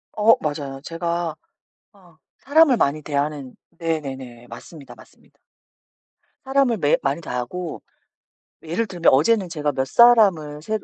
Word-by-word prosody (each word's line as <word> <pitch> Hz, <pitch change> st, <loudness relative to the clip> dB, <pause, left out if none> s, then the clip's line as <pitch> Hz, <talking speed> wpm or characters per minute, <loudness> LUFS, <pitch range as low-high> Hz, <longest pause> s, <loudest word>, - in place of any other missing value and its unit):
어 220 Hz, +1 st, +5 dB
맞아요. 140 Hz, -3 st, -5 dB
제가 170 Hz, 0 st, -3 dB, 0.6 s
어 180 Hz, -5 st, -22 dB, 0.2 s
사람을 285 Hz, -1 st, +4 dB
많이 150 Hz, -6 st, 0 dB
대하는 145 Hz, -2 st, -3 dB, 0.2 s
네네네. 135 Hz, -8 st, -5 dB
맞습니다, 135 Hz, +5 st, -12 dB
맞습니다. -, -, -21 dB, 1.1 s
사람을 270 Hz, -4 st, +1 dB
매일 145 Hz, -4 st, +2 dB
많이 140 Hz, +4 st, -1 dB
대하고, 155 Hz, +6 st, -5 dB, 0.8 s
예를 175 Hz, +8 st, -2 dB
들면 175 Hz, -3 st, +2 dB
어제는 185 Hz, +6 st, +2 dB
제가 150 Hz, -3 st, -2 dB
몇 130 Hz, -1 st, -2 dB
사람을 190 Hz, -, +4 dB
새로 215 Hz, +5 st, -4 dB
160 Hz, 285 characters per minute, -21 LUFS, 140-200 Hz, 1.1 s, 어